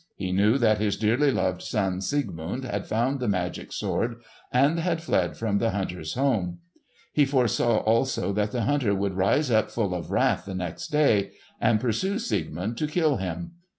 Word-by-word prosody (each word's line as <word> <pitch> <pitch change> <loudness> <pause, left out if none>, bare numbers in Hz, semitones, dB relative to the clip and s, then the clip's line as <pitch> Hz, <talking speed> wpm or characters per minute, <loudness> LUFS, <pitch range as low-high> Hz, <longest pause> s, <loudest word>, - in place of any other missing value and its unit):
He 95 -2 -3
knew 105 +6 +3
that 110 -5 +3
his 105 -1 0
dearly 120 +7 +2
loved 95 -7 0
son 95 -4 -1
Siegmund 100 - -2
had 100 -4 -3
found 125 +5 0
the 125 - -2
magic 90 -3 -2
sword, 115 0 -1 0.4
and 140 +6 +3
had 165 -1 0
fled 165 - 0
from 105 -3 0
the 115 - +1
hunter's 90 -6 -3
home. 110 -10 0 0.6
He 150 - +4
foresaw 125 -4 +2
also 115 -2 +1
that 105 +1 0
the 120 0 -1
hunter 130 -6 +1
would 100 0 -1
rise 100 +9 +2
up 110 -1 +3
full 105 -6 -1
of 90 - -5
wrath - - +1
the 95 - -5
next 90 -3 -4
day, 140 -10 +2 0.3
and 110 -2 +3
pursue 130 - 0
Siegmund 115 - -3
to 155 - 0
kill 150 -3 +1
him. 95 - -4
110 Hz, 180 wpm, -26 LUFS, 95-135 Hz, 0.6 s, He